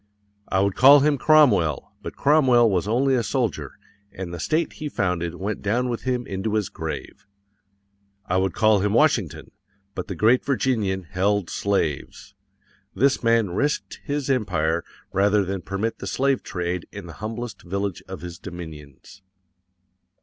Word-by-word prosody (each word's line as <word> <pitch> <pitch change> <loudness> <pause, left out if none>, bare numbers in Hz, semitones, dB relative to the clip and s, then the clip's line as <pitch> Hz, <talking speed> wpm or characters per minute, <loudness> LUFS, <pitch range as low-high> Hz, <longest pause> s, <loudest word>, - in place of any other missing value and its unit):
I 95 - +1
WOULD 100 -1 +1
CALL 140 +3 +8
HIM 145 -1 +2
CROMWELL,_ 105 - +3
but - - -7
Cromwell 130 -5 +4
was 95 +1 0
only 130 +5 +2
a 125 - +2
soldier, 110 - -2 0.3
and 90 -2 -7
the 85 - -6
state 155 - 0
he 150 -1 -6
founded 90 - -2
went 100 +4 -4
down 120 +5 0
with 120 - -3
him 125 -1 -1
into 100 +3 -3
his 105 -4 0
grave. - - -7 1.0
I 90 - 0
WOULD 95 -2 0
CALL 110 -2 +4
HIM 100 +1 0
WASHINGTON, 100 - +1 0.4
but 90 - -5
the 95 - -5
great 115 +8 +3
Virginian 110 -8 0
_held 100 0 0
slaves. 95 -8 -2 0.6
THIS 135 +2 +2
MAN 115 -5 +2
RISKED 145 +11 -2
HIS 145 -2 -3
EMPIRE 85 - 0 0.3
rather 100 +1 +3
than 95 0 -3
permit 100 +5 -3
the - - -6
slave 135 0 +1
trade 90 -2 -4
in - - -8
the - - -9
humblest 115 +2 -5
village 100 0 -3
of - - -8
his 85 -1 -8
dominions. 80 -2 -10
100 Hz, 155 wpm, -23 LUFS, 90-125 Hz, 1.0 s, CALL